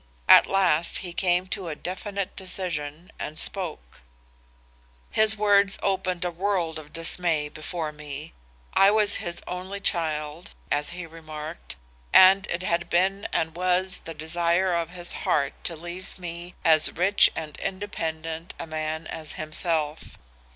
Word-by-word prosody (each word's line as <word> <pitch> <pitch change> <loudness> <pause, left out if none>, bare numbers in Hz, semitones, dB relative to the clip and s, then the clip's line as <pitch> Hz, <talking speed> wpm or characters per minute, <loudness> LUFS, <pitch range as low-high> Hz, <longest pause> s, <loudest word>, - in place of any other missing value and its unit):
At - - +9
last 180 -4 +2
he 175 - -5
came 180 0 +2
to 190 -3 -3
a 155 - -4
definite 195 +3 -4
decision 175 -4 -5
and 155 +1 -5
spoke. 165 - -4 1.1
"His 220 0 +4
words 200 -1 +4
opened 185 -2 0
a 175 - -1
world 175 -3 -1
of 150 -1 -13
dismay 165 -2 0
before 155 +1 -4
me. 150 +1 -8 0.4
I 195 - +6
was 210 -1 +3
his 175 -4 -3
only 185 +2 -5
child, 160 -2 -1 0.2
as 145 0 +1
he 180 0 -6
remarked, 160 0 -8 0.4
and 195 +2 +8
it 170 +2 -3
had 170 -1 0
been 190 +3 +1
and 160 0 -1
was 180 +1 0
the 165 - -8
desire 170 +4 +1
of 170 -1 0
his 175 -1 -3
heart 140 -2 0
to 170 - 0
leave 175 +4 -8
me 175 0 -7
as 160 -2 +5
rich 190 +4 +5
and 155 -2 -5
independent 165 -4 -4
a - - -5
man 155 0 -3
as 155 -1 -4
himself. 155 -1 -1
170 Hz, 145 wpm, -26 LUFS, 155-185 Hz, 1.1 s, At